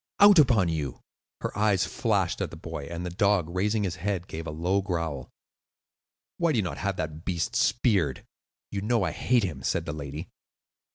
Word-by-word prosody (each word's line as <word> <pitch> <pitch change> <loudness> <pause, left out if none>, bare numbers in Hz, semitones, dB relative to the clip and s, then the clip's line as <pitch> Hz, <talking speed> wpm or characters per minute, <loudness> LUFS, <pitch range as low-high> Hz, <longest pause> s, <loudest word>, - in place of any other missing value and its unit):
Out 205 -3 +9
upon 120 - +5
you!" 75 -6 -3 0.4
Her - - -3
eyes 105 -2 +3
flashed - - 0
at - - -1
the - - -10
boy, 70 - -6
and 85 +1 -5
the 90 - -3
dog, 100 -2 +2
raising 105 +4 +1
his 90 -4 -2
head, 95 0 -2
gave 80 +1 -6
a - - -3
low 90 +6 0
growl. 85 -8 -3 1.1
"Why 170 -2 +2
do - - +1
you 105 - +2
not 90 - -4
have 100 -2 -1
that 80 -1 -4
beast 85 -3 -2
speared? 95 - +2 0.5
You 100 - -2
know 110 0 +1
I - - 0
hate 120 -3 +2
him," 75 -8 -3
said - - -1
the 75 - -3
lady. 75 +3 -6
90 Hz, 190 wpm, -27 LUFS, 80-105 Hz, 1.1 s, Out